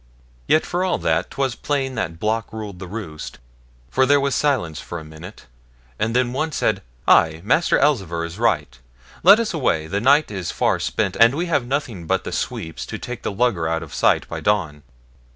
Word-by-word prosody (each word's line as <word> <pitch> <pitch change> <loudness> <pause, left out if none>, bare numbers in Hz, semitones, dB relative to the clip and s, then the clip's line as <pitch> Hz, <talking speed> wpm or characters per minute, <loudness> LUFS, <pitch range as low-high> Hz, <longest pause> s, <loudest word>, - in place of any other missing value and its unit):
Yet 155 - +3
for 180 +1 -1
all 185 -2 +1
that 80 +1 0
'twas 135 -3 -1
plain 135 -1 -2
that 85 -9 -3
Block 110 +2 -1
ruled 105 -4 -7
the 95 - -7
roost, 90 -7 -7 0.5
for 130 0 +3
there 145 +1 +5
was 140 -1 0
silence 120 - 0
for 85 - -7
a 80 - -7
minute, 80 +6 -12 0.5
and 115 +2 0
then 125 -1 +1
one 155 +4 -1
said, - - 0 0.3
'Ay, 80 -1 +5
Master 160 +9 +3
Elzevir 95 - +1
is 85 +4 -8
right; 75 - 0 0.4
let 200 +5 +8
us 230 -4 -1
away, 105 - 0
the 100 +5 -2
night 140 +2 +4
is 95 -4 -4
far - - +1
spent, - - -1
and 115 +3 +6
we 170 +4 -1
have 145 -8 0
nothing 120 - -3
but 95 +1 +1
the - - -5
sweeps 80 -6 -4
to - - -5
take 125 -1 -7
the - - -3
lugger 100 -6 +1
out 80 0 -1
of - - -11
sight - - +2
by - - -5
dawn.' 85 -8 0
110 Hz, 200 wpm, -21 LUFS, 85-135 Hz, 0.5 s, let